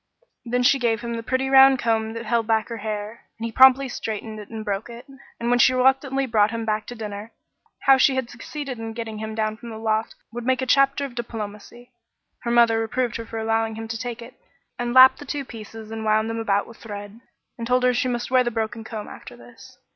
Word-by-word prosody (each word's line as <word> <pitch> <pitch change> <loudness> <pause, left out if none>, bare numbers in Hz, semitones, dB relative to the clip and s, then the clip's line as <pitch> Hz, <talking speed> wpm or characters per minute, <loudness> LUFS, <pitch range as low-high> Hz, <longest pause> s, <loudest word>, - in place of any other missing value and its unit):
Then 245 +1 -1
she 275 +2 +4
gave 230 -3 0
him 235 -1 -4
the 230 - -3
pretty 260 +3 -1
round 270 0 +7
comb 225 -2 0
that 230 0 -6
held 230 0 0
back 220 0 +1
her 230 - -5
hair, 215 +1 -5
and 225 - -5
he 230 - -4
promptly 265 +3 +6
straightened 220 -2 -5
it 210 - -10
and 220 -1 -7
broke 200 +2 -3
it; 235 +1 -10 0.3
and 235 +1 -1
when 245 - +3
she 255 +1 +5
reluctantly 270 +1 +2
brought 215 -4 +3
him 230 0 -4
back 215 0 -1
to 245 - -7
dinner 210 0 -7 0.5
how 270 -1 +6
she 265 - +4
had 260 -2 -1
succeeded 255 +1 -7
in 225 0 -5
getting 220 -2 -6
him 220 0 -5
down 215 0 -1
from 235 - -10
the 220 - -7
loft 220 0 -1 0.2
would 240 0 -5
make 260 +1 +1
a 260 - -1
chapter 275 +2 +3
of 270 - -8
diplomacy 235 +1 -7 0.5
her 235 - -4
mother 235 -1 +4
reproved 235 +1 -1
her 230 -1 -8
for 225 - -6
allowing 225 0 0
him 225 0 -6
to 230 - -3
take 240 0 -5
it, 240 +2 -12 0.5
and 240 0 -2
lapped 260 0 +8
the - - -8
two 280 0 -4
pieces 220 -2 -10
and 225 0 -5
wound 220 +1 +1
them 225 - -3
about 205 -2 +1
with 230 - -14
thread, 205 0 -9 0.4
and 230 - -4
told 250 +1 +2
her 250 0 +4
she 255 +2 0
must 245 0 -3
wear 255 -1 +5
the 240 - 0
broken 225 0 -3
comb 220 -1 -7
after 120 - -11
this. 120 0 -16
230 Hz, 240 wpm, -23 LUFS, 220-250 Hz, 0.5 s, lapped